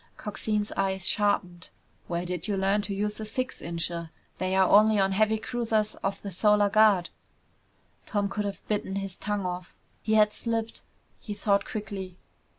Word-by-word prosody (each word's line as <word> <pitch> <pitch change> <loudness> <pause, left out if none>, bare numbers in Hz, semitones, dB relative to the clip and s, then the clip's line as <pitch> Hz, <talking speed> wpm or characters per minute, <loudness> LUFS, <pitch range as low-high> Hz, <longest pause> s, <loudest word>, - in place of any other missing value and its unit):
Coxine's 210 0 -2
eyes 190 -1 -1
sharpened. 185 -4 0 0.4
"Where 175 0 -2
did 180 +1 -4
you 205 -2 0
learn 195 +2 +2
to 200 0 -3
use 210 +2 -2
a - - -4
six 255 +4 -3
incher? 170 0 -3 0.3
They're 190 +1 +3
only 215 +3 +6
on 195 -1 +3
heavy 215 +2 +3
cruisers 220 -2 -1
of 195 0 -2
the 200 - -5
Solar 210 +2 +3
Guard!" 205 -5 +4 1.0
Tom 205 -1 0
could 205 +1 -3
have 200 -1 -6
bitten 205 -2 -1
his 195 -2 -3
tongue 205 -2 -2
off. 180 0 -5 0.3
He 220 - +1
had 210 -1 +5
slipped. 230 -1 -3 0.4
He 210 - -6
thought 200 -1 +1
quickly. 195 -4 -5
205 Hz, 160 wpm, -27 LUFS, 190-215 Hz, 1.0 s, only